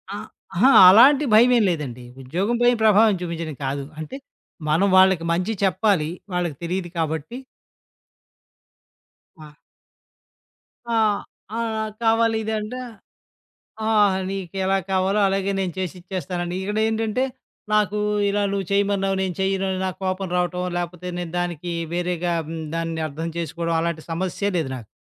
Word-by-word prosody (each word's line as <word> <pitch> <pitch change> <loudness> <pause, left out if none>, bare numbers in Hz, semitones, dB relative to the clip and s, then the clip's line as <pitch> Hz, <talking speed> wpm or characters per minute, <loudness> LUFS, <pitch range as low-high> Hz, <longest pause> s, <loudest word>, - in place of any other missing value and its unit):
ఆ! - - -4 0.4
అహా! 265 - +5 0.2
అలాంటి 270 +9 +7
భయమేం 240 +1 +6
లేదండి. 135 -7 -4 0.2
ఉద్యోగం 190 - -1
పైన 245 0 +5
ప్రభావం 215 0 +5
చూపించడం 165 -3 -4
కాదు. 140 +1 -2 0.2
అంటే, 160 - -6 0.5
మనం 175 +6 +3
వాళ్ళకి 185 -3 +5
మంచి 185 +6 -1
చెప్పాలి. 190 -5 +2 0.2
వాళ్ళకి 175 -5 -1
తెలీదు 175 +1 -3
కాబట్టి 160 - -3 2.1
ఆ! 150 -1 -16 1.3
ఆ! 235 -1 -1 0.6
ఆ! - - -1 0.4
కావాలి 225 0 +3
ఇదంటే. 220 +3 -3 1.1
ఆ! - - +1 0.4
నీకెలా 195 0 -1
కావాలో 190 +2 +1
అలాగే 195 0 0
నేను 180 -3 -2
చేసిచ్చేస్తానండి. 180 -1 -4
ఇక్కడేంటంటే, 220 +4 0 0.5
నాకు 210 -1 +2 0.3
ఇలా 205 +1 0
నువ్వు 195 -2 -2
చేయమన్నావు, 200 -1 +1
నేను 185 -2 -2
చెయ్యనుని 190 0 0
నాకు 185 - -5
కోపం 185 0 -2
రావటం. 180 0 -1
లేకపోతే 175 0 -4
నేను 175 -2 -4
దానికి 175 -1 -3 0.2
వేరేగా 175 0 -1 0.2
హ్మ్. 165 0 -5
దాన్ని 165 -1 -2
అర్థం 160 +3 -5
చేసుకోవడం, 170 0 -2
అలాంటి 170 -1 -2
సమస్యే 185 +4 -2
లేదు 160 -5 -1
నాకు. 115 -4 -11
185 Hz, 120 wpm, -23 LUFS, 170-205 Hz, 2.1 s, అలాంటి